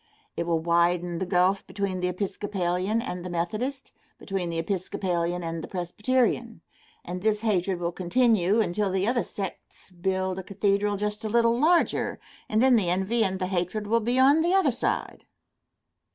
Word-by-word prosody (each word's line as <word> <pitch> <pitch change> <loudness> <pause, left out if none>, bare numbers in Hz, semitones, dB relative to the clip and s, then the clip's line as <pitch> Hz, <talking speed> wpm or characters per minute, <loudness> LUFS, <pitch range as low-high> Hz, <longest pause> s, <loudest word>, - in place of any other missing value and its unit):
It 170 - -3
will 170 -1 +2
widen 170 +1 +1
the 190 - -2
gulf 185 +1 +2
between 200 -2 -3
the 180 - 0
Episcopalian 195 +2 -1
and 180 -9 -5
the 180 - -5
Methodist, 220 +11 -3 0.3
between 190 -3 -3
the 165 - -3
Episcopalian 180 -1 -2
and 165 -1 -4
the - - -6
Presbyterian, 225 +3 -1 0.4
and 180 +1 -5
this 215 0 +1
hatred 195 -4 0
will 170 0 -1
continue 205 +2 +2
until 200 +1 0
the 190 +2 0
other 240 0 +2
sects 195 -2 -7
build 190 +1 -2
a - - -6
cathedral 200 +1 0
just 210 +2 -3
a 215 - -2
little 230 +1 +3
larger, 335 +4 +2 0.3
and 215 +3 +2
then 260 -2 +6
the 190 -6 +1
envy 190 +6 +1
and 190 -2 0
the 185 - -2
hatred 185 +3 -2
will 230 +3 +2
be 240 +3 0
on 280 +4 +5
the 345 +3 +2
other 385 - +4
side. - - -3
195 Hz, 170 wpm, -26 LUFS, 180-220 Hz, 0.4 s, then